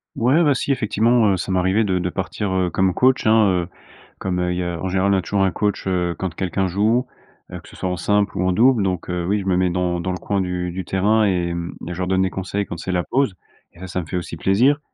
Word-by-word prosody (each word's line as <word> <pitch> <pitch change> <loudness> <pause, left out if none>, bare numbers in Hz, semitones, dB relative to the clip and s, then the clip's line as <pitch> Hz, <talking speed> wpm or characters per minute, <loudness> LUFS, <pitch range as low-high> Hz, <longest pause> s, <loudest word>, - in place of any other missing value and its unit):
Ouais, 135 +9 +3
bah, 145 -3 +3
si 140 - -1
effectivement, 115 -1 +2
heu, 95 - 0
ça 95 - -4
m'est 95 - +2
arrivé 95 +5 +2
de 95 -3 0
de 90 - -1
partir, 95 +2 -3
heu, 95 -1 +1
comme 95 +2 +1
coach, 130 -2 +3
hein, 110 -1 +5 0.2
heu, - - -14 0.5
comme, 90 -1 -2
heu, 90 0 0
il 90 - -2
y 90 - -1
a 85 -1 -3
en 95 - -2
général 95 +2 +2
on - - +3
a - - 0
toujours 100 +1 0
un 95 - +2
coach, 105 +1 -1
heu, 90 -2 0
quand 95 -3 -3
quelqu'un 95 +2 -1
joue, 110 +7 +1 0.5
heu, - - -6
que - - -16
ce - - -15
soit 95 - -3
en 90 - -1
simple 105 +3 0
ou 90 - 0
en - - +2
double. 115 +4 +4
Donc 90 -3 -2
heu, 90 -1 -2
oui, 105 +2 +1
je 95 - -6
me 95 -2 +1
mets 90 0 +2
dans 90 0 -1
dans 95 - -2
le 90 - -3
coin 100 +1 -1
du 90 -1 -3
du 95 +2 -4
terrain 105 +5 +2
et 90 -3 0
mmh 85 0 -5
et 90 - -4
je - - -8
leur 90 - -1
donne 95 0 +2
des 95 - -1
conseils 95 +2 -3
quand 85 - -7
c'est 95 - -4
la 90 -1 0
pause 130 -4 0 0.4
et - - -19
ça, 95 - -7
ça 90 0 -3
me 80 - -10
fait 90 - -3
aussi 85 -1 -5
plaisir 125 - +3
95 Hz, 295 wpm, -21 LUFS, 90-105 Hz, 0.5 s, hein